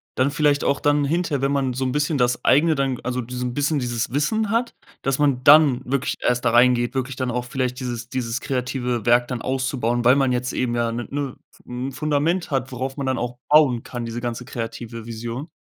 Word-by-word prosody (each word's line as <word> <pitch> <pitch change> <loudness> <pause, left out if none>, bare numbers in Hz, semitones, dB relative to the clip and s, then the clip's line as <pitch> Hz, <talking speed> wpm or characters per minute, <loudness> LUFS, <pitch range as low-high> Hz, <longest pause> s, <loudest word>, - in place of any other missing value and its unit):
dann 130 +2 +2
vielleicht 145 -1 +2
auch 140 - +1
dann 145 0 +2
hinterher, 155 -2 0
wenn 135 0 +1
man 135 -2 0
so 130 +1 -2
'n 130 - -1
bisschen 150 +1 0
das 125 -1 +1
Eigene 155 +3 +4
dann, 135 -2 0
g - - -13
also, 125 0 -1
diesen 125 +1 -4
bisschen 145 +2 0
dieses 120 -3 -2
Wissen 200 - 0
hat, 230 +2 0 0.3
dass 135 -1 0
man 140 -4 +1
dann 145 -4 +7
wirklich 135 +1 -1
erst 125 0 0
da 120 - +3
reingeht, 120 0 +4
wirklich 130 0 -2
dann 130 -1 -2
auch 125 +1 -2
vielleicht 125 0 -2
dieses 120 -2 -5
dieses 125 -2 -3
kreative 125 -3 -2
Werk 120 0 +4
dann 125 -3 -3
auszubauen, 130 -2 -1
weil 125 +2 +6
man 135 -2 +2
jetzt 125 0 -1
eben 120 -2 -1
ja 120 0 +1
damit 115 -1 -5
ne 145 - -1
'ne 135 -3 -4 0.2
f - - -21
m 125 +2 -5
Fundament 155 +5 0
hat, 135 -1 -1
worauf 130 +2 -4
man 140 - -3
dann 130 0 0
auch 120 0 -4
bauen 145 -6 +5
kann, 120 -1 -6
diese 115 +1 -4
ganze 120 0 -4
kreative 115 -1 -6
Vision. 120 +6 -6
130 Hz, 225 wpm, -22 LUFS, 120-140 Hz, 0.3 s, dann